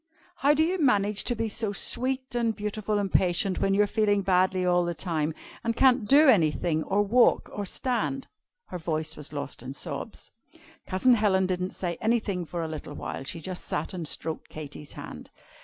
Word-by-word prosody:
"How 290 +2 +4
do 315 - +3
you 360 +3 0
manage 210 -7 +3
to 240 - 0
be 225 0 -1
so 215 -1 -2
sweet 260 +5 0
and 230 -2 0
beautiful 210 0 -2
and 200 -2 -1
patient, 185 +1 +2
when 195 0 +2
you're 205 +1 +4
feeling 205 -1 +1
badly 185 0 +2
all 180 0 +3
the 175 0 -2
time, 160 -4 -1 0.3
and 230 -1 -1
can't 255 -4 +4
do 290 +5 +6
anything, 165 - +3
or 205 +2 +1
walk, 235 +4 +3
or 205 -1 -3
stand?" 255 +5 -1 0.4
her 180 - -5
voice 155 -1 -2
was 150 -1 -7
lost 145 -3 -5
in 130 +2 -7
sobs. - - -6 0.6
Cousin 190 +7 +3
Helen 200 -4 +3
didn't 185 0 -2
say 175 -2 -3
anything 215 -6 0
for 170 0 -4
a - - -3
little 155 -2 -7
while. - - -5
She 165 - -5
just 180 +2 -6
sat - - -3
and 170 -4 -4
stroked 160 +1 -4
Katy's 150 -1 -8
hand. - - -9
195 Hz, 190 wpm, -27 LUFS, 170-225 Hz, 0.6 s, do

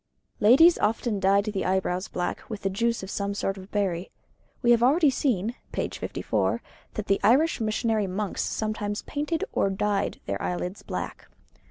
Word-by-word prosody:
Ladies 270 +11 +7
often 220 0 0
dyed 200 +1 +3
the 210 -3 -2
eyebrows 185 0 0
black 180 - -4
with 215 -2 -6
the 195 - 0
juice 230 +2 0
of 190 - -6
some 200 0 -2
sort 195 -1 -1
of 190 +1 -12
berry. 190 -3 -1 0.5
We 240 - +5
have 235 -1 +5
already 285 +4 +5
seen 235 -5 0 0.2
(p. - - -1
54) - - -1 0.4
that 215 - -3
the 195 - +2
Irish 270 +5 +3
missionary 215 -1 0
monks 195 +2 -2
sometimes 215 -1 -2
painted 300 +3 -2
or 195 - +2
dyed 200 +1 -1
their 100 0 -3
eyelids 180 +2 -3
black. - - -5
210 Hz, 165 wpm, -26 LUFS, 195-235 Hz, 0.5 s, Ladies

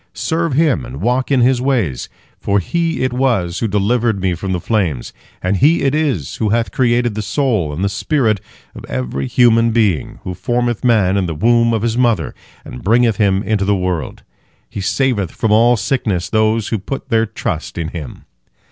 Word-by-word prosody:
Serve 165 -2 -1
Him 150 -3 +2
and 65 +3 -8
walk 125 +7 0
in 135 -3 +3
His 125 0 +3
ways, 115 - -1 0.3
for 100 - 0
He 165 - -1
it 130 -1 0
was 115 -10 0
who 115 - 0
delivered 110 +2 +1
me 95 -1 0
from 95 +3 -4
the 90 - -1
flames, 85 - -1 0.3
and 95 +2 +1
He 155 - +3
it 135 0 +2
is 140 - -1
who 110 - 0
hath 115 +2 0
created 120 -2 +1
the 110 - -3
soul 105 - 0
and 80 +6 -4
the - - +2
spirit 110 -1 0 0.3
of - - -10
every 65 +2 -3
human 115 - +4
being, 110 -9 0
who 95 - -4
formeth 120 +3 -1
man 105 -6 +3
in 95 -2 0
the 80 - -4
womb 115 +6 +3
of 110 -2 -1
his 115 +1 0
mother, 115 -10 +1 0.3
and 60 - -9
bringeth 115 +1 +3
him 100 -2 +2
into 105 -2 0
the 100 +1 +2
world. 90 -4 -3 0.4
He 100 - -6
saveth 105 - 0
from 110 +4 -2
all 115 +3 +5
sickness 100 -5 -1
those 110 0 +1
who 110 - -1
put 135 +8 -6
their 115 0 +2
trust 85 -5 -4
in 80 -2 -3
Him." 80 -6 -8
110 Hz, 190 wpm, -17 LUFS, 95-120 Hz, 0.4 s, all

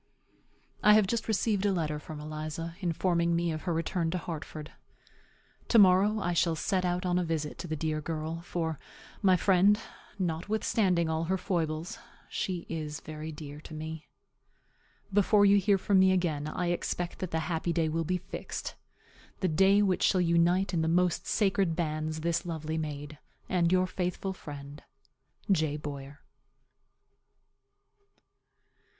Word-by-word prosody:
I 210 - +7
have 215 -2 +5
just 225 +3 -2
received 210 -2 +1
a 205 - +3
letter 155 -5 -1
from 155 0 -8
Eliza, 155 +2 -5
informing 170 -1 +1
me 170 0 0
of 155 0 -4
her - - +1
return 165 +1 -1
to 180 - -1
Hartford. 155 -2 -6 1.0
To 235 - +4
morrow 200 +2 +6
I 175 -3 -1
shall 170 -1 +2
set 185 +4 0
out 180 +1 -1
on 180 0 +2
a - - 0
visit 160 -3 -3
to 175 - -5
the 155 - -2
dear 155 0 -2
girl; 160 +1 -4
for, 165 -3 -3 0.4
my 185 -2 +5
friend, 195 +3 +4 0.4
notwithstanding 185 0 0
all 160 +1 -1
her 190 +3 0
foibles, 170 +3 -2 0.3
she 180 -3 -2
is 155 -2 -4
very 155 0 -7
dear 150 -1 -9
to 155 - -10
me. 155 0 -6 1.1
Before 205 +1 +5
you 200 0 +6
hear 200 0 +3
from 195 0 +3
me 190 0 +6
again 160 -6 0
I 175 +2 -1
expect 175 0 -3
that 185 - -3
the 160 -1 -1
happy 165 +1 -1
day 165 -1 +1
will 165 +1 -1
be 180 +3 0
fixed - - -6 0.7
the 185 - +1
day 195 +5 +4
which 190 -3 +1
shall 185 - +3
unite 175 +2 +2
in 165 - +1
the 160 - 0
most 175 +1 +1
sacred 195 -5 +1
bands 155 -1 -2
this 170 +1 0
lovely 160 -2 -3
maid 150 -1 -6 0.3
and 175 -2 +2
your 185 0 +4
faithful 185 +1 -3
friend, 145 -4 -9 0.7
J. 155 -5 +2
BOYER. 140 -1 -7
170 Hz, 155 wpm, -30 LUFS, 155-185 Hz, 1.1 s, I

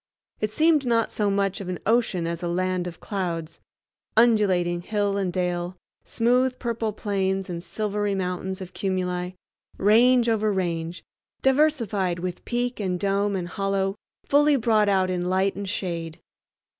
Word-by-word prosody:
It 215 - 0
seemed 310 +5 +3
not 230 -3 +1
so 210 -1 0
much 195 -1 0
an 180 -2 -4
ocean 220 -6 +2
as 170 0 -3
a 175 - -2
land 180 +1 -1
of 170 -1 -8
clouds—undulating 185 +1 0
hill 205 +1 -1
and 195 -3 0
dale, 180 0 -2 0.3
smooth 250 +2 +2
purple 230 -2 -2
plains, 195 -3 -1
and 170 -1 -4
silvery 205 -1 -2
mountains 190 0 -3
of 185 - -8
cumuli, 180 -2 -2 0.4
range 240 +4 +5
over 215 -2 +2
range, 170 -3 -2 0.4
diversified 240 - +2
with 180 0 -5
peak 245 0 -2
and 185 -3 -1
dome 200 +1 +1
and 175 -2 -3
hollow 195 0 0 0.3
fully 295 +1 +4
brought 220 -4 +3
out 190 -2 +2
in 180 0 -1
light 190 +1 +1
and 200 0 -5
shade. 170 -5 -4
195 Hz, 145 wpm, -25 LUFS, 180-220 Hz, 0.4 s, range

